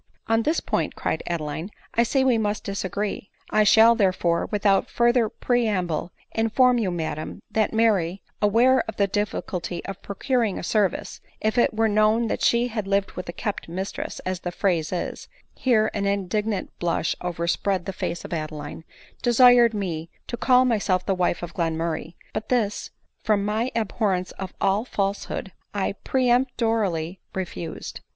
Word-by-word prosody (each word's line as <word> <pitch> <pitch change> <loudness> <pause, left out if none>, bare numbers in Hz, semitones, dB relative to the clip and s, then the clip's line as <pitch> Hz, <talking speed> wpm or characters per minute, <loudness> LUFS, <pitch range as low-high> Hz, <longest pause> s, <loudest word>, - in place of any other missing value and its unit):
"On 225 0 +2
this 310 +8 +1
point," - - -1
cried - - -2
Adeline, 160 +1 -3 0.2
"I 230 - +3
see 265 +3 +2
we 250 -4 +3
must 210 -1 -1
dis 200 0 -3
agree 200 +1 -3
— - - -24
I 215 - +4
shall, 220 +2 +7
therefore, 185 -6 +1
without 200 -2 +2
further 240 -1 +3
preamble, 185 -9 0 0.2
in 225 0 0
form 250 +1 +4
you, 210 -5 0
madam, 160 -3 -4
that 220 -1 +1
Mary, 200 -5 +2 0.2
aware 235 +5 +5
of 225 - -5
the 200 - +4
difficulty 195 -3 -3
of 195 -1 -6
procuring 225 0 -1
a - - -5
service, 195 0 0 0.2
if 215 +2 0
it 240 -3 +3
were 225 0 +3
known 215 +2 +3
that - - -2
she 240 +1 +3
had 215 -4 -3
lived 200 0 +1
with 180 -1 -7
a - - -1
kept 200 0 -4
mistress, 190 +3 -4
as 185 -1 -3
the 175 - -4
phrase 175 -4 0
is, 180 - -4 0.3
(here 220 -4 +2
an 200 -1 -1
indig 200 +1 0
nant 210 -4 -2
blush 170 -1 0
overspread 175 +2 -1
the 195 - -4
face 175 - -4
of - - -6
Adeline,) 155 -1 -5 0.4
desired 240 -1 +6
me 170 -5 -3 0.2
to - - -4
call 250 +1 +4
myself 200 -6 +1
the 195 - +1
wife 180 -1 0
of 175 - -6
Glenmurray: 165 -1 -2 0.2
but 215 - -4
this, 220 -5 0 0.3
from 210 -3 +2
my 220 +4 0
abhorrence 200 -4 0
of 190 -1 -6
all 195 +3 +2
falsehood, 200 -3 -3 0.2
I 200 - 0
peremptorily 230 - +1 0.2
refused." 175 -3 -5
200 Hz, 165 wpm, -24 LUFS, 180-225 Hz, 0.4 s, shall